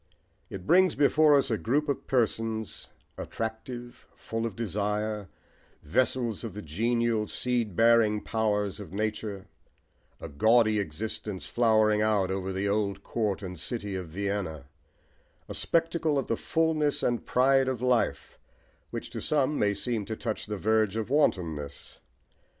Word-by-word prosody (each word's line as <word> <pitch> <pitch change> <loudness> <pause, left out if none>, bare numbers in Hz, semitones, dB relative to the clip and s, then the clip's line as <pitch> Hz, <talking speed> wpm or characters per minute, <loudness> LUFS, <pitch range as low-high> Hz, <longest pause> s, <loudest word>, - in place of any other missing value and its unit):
It 95 -2 -7
brings 185 - +5
before 150 +1 +5
us 140 -3 +2
a 110 - 0
group 145 +6 0
of 140 - -2
persons, 115 -3 -1 0.3
attractive, 120 +2 -6
full 115 +1 -3
of 110 - -8
desire, 105 -1 -2 0.5
vessels 120 - 0
of 110 -5 -6
the 105 - -6
genial, 115 +6 0
seed 120 -6 -1
bearing 115 -1 +4
powers 105 -3 -1
of 95 -4 -9
nature, 105 -2 -3 0.7
a - - -6
gaudy 110 +8 +3
existence 105 +3 -4
flowering 110 -2 +3
out 105 -3 +2
over 95 0 -2
the 95 +2 -1
old 100 -1 -1
court 105 -4 -2
and 90 -3 -6
city 105 +1 -3
of 90 -2 -4
Vienna, 95 -3 -3 0.8
a - - -6
spectacle 165 -2 +1
of 135 - 0
the 115 - 0
fulness 160 +1 0
and 120 -1 0
pride 135 +1 +4
of 130 -3 -1
life 125 -1 0 0.5
which - - -6
to - - -5
some 150 0 +1
may 100 -1 +2
seem 115 -2 -1
to 110 +2 -4
touch 110 -1 -4
the 105 0 -3
verge 110 0 +2
of 110 +2 -3
wantonness. 80 - -1
110 Hz, 145 wpm, -28 LUFS, 100-120 Hz, 0.8 s, brings